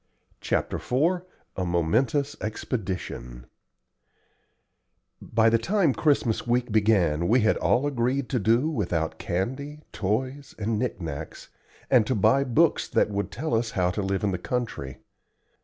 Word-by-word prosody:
CHAPTER - - -1
IV 165 +8 +1 0.3
A 95 - -2
MOMENTOUS 115 - +1
EXPEDITION 90 - -4 1.8
By 110 0 +2
the 115 0 +4
time 175 - +2
Christmas 130 -8 +1
week 120 0 +1
began 95 -7 +2
we 115 +1 +3
all 125 +3 +2
had 145 - 0
agreed 125 +2 0
to 125 - 0
do 115 +7 +3
without 90 - -2
candy, 130 +11 -3
toys, 130 +7 -2
and 110 0 -1
knick 125 -3 -2
knacks, 80 -5 -7 0.4
and 120 -5 +5
to 130 - +1
buy 110 +7 +4
books 125 -4 +2
that - - +1
would 100 0 -2
tell 150 +4 -4
us 115 0 +1
how 90 -1 +2
to 105 - -2
live 95 0 -1
in 100 - +1
the 90 - -3
country. 90 - -4
115 Hz, 140 wpm, -26 LUFS, 95-130 Hz, 1.8 s, and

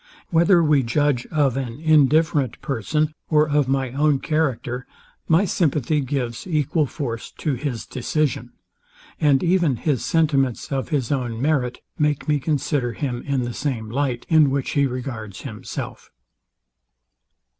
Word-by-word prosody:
Whether 170 +1 +5
we 150 -3 +4
judge 130 +1 0
of 145 -5 +1
an 130 -2 -4
indifferent 155 -3 +3
person, 150 +5 -1 0.2
or 155 -1 +4
of 145 -2 +2
my 135 -2 0
own 145 +2 +2
character, 130 -5 -1 0.4
my 165 +5 +4
sympathy 150 -4 +1
gives 125 -1 -3
equal 155 -2 +1
force 120 -5 -5
to 150 - -1
his 130 -3 -3
decision: 140 +2 -2 0.7
And 140 -3 +3
even 175 -6 +2
his 130 0 -1
sentiments 140 -7 +1
of 135 -1 -2
his 140 -6 -1
own 120 -5 -2
merit 130 -3 0 0.2
make 150 0 0
me 150 -1 +2
consider 140 -4 -1
him 125 -4 -3
in 135 -3 0
the 120 0 -4
same 115 -7 -3
light, 130 -2 -1
in 155 -3 +5
which 135 -1 -1
he 140 -1 +2
regards 120 -6 -6
himself. 110 -6 -7
140 Hz, 140 wpm, -22 LUFS, 125-155 Hz, 0.7 s, Whether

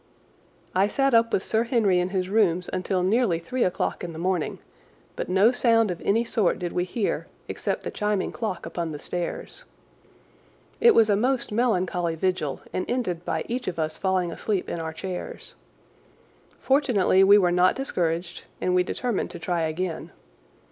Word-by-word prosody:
I 190 +2 +3
sat 270 +4 +1
up 230 0 +4
with 190 - +1
Sir 220 +1 +1
Henry 220 -7 +2
in 180 +1 0
his 185 -1 -1
rooms 185 -4 +1
until 185 0 -1
nearly 205 -2 +2
three 235 +10 -2
o'clock 180 - -1
in 170 -1 -5
the - - -8
morning, 180 -1 -1 0.6
but - - -4
no 195 +5 +5
sound 230 -4 +3
of 175 - -6
any 225 +4 +1
sort 220 -5 +1
did 175 -1 -4
we 180 - 0
hear 205 +3 -2 0.2
except - - -3
the - - -4
chiming 210 -2 -1
clock 215 -7 -4
upon 165 -1 -4
the - - -5
stairs. 175 +4 -5 1.2
It 470 -1 +6
was 220 -2 +5
a - - +4
most 245 +3 0
melancholy 185 -7 0
vigil 175 -5 -1
and 185 - -3
ended 185 -9 -2
by - - -2
each 245 +2 -3
of 180 - -3
us 155 -1 -2
falling 185 -3 0
asleep 195 +2 -2
in 170 - -4
our 160 -1 -4
chairs. 180 +3 -6 1.1
Fortunately 245 -9 +3
we 200 +2 +7
were 180 -3 +3
not 180 +1 +4
discouraged, 175 -9 -2
and 180 - 0
we 180 - +4
determined 230 +4 -2
to - - -8
try 175 0 -2
again. 160 +1 -3
185 Hz, 175 wpm, -25 LUFS, 175-225 Hz, 1.2 s, we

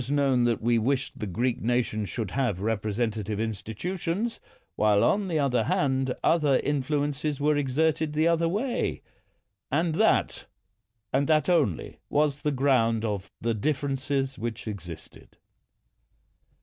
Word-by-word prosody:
It - - -6
was 145 - +1
knoAATi 135 -4 +3
that 120 -1 +1
we 120 0 +3
wished 130 +3 -1
the 105 - -3
Greek 120 +7 -1
nation 115 -3 0
should 110 -2 -4
have 125 -9 0
representative 110 0 -2
institutions, 165 - -3 0.4
while, 105 -1 +3
on 205 -1 +2
the 165 -3 0
other 140 -4 +1
hand, 135 -6 +1
other 150 -5 +3
influences 145 +1 -1
were 150 +1 +2
exerted 150 +2 +1
the 155 +2 +2
other 165 0 +2
way; 235 +8 -1 0.7
and 160 +3 +1
that, - - +2 0.7
and 135 +1 +2
that 155 0 +3
only, 145 - +1
was 145 -1 +1
the 150 - +1
ground 125 -5 +2
of 100 -3 -3
the 115 +1 0
differences 135 +2 -1
which 115 0 -5
existed. 90 -6 -9
135 Hz, 135 wpm, -27 LUFS, 115-150 Hz, 0.7 s, knoAATi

